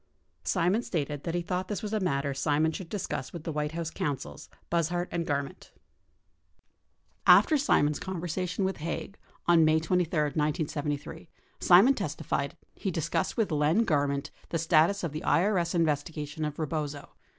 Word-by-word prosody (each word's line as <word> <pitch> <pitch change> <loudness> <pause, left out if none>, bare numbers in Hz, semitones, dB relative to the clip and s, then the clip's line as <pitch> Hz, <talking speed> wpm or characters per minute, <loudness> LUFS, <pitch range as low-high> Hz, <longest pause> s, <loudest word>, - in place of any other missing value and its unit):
Simon 185 +4 +1
stated 150 - -3
that 170 0 -2
he 175 - -1
thought 185 +1 -2
this 205 -1 -4
was 210 0 -4
a 215 - +1
matter 140 -6 0
Simon 150 +3 +1
should 165 +1 -7
discuss 180 -9 -4
with 170 -3 -8
the 165 - -3
White 150 0 -2
House 165 -1 -3
counsels, 140 -3 -4 0.2
Buzhardt 175 +1 0
and 170 -1 -2
Garment. 140 +5 -3
50 - - -31 1.5
After 315 - +7
Simon's 150 - +2
conversation 180 +1 -3
with 190 - -2
Haig 170 +5 -4 0.3
on 170 -1 +5
May 155 0 +4
23, 170 0 0
1973, 150 -1 -2 0.3
Simon 195 +10 +7
testi - - -5
fied - - -2 0.2
he - - -3
discussed - - -1
with 220 -6 +1
Len 155 +8 +3
Garment 140 -4 0 0.2
the 165 - -1
status 165 +4 +3
of 170 - -2
the 155 +2 -5
IES 180 -2 +2
investigation 155 -1 -1
of 150 -1 -3
Eebozo. 150 -2 -3
165 Hz, 160 wpm, -29 LUFS, 150-180 Hz, 1.5 s, After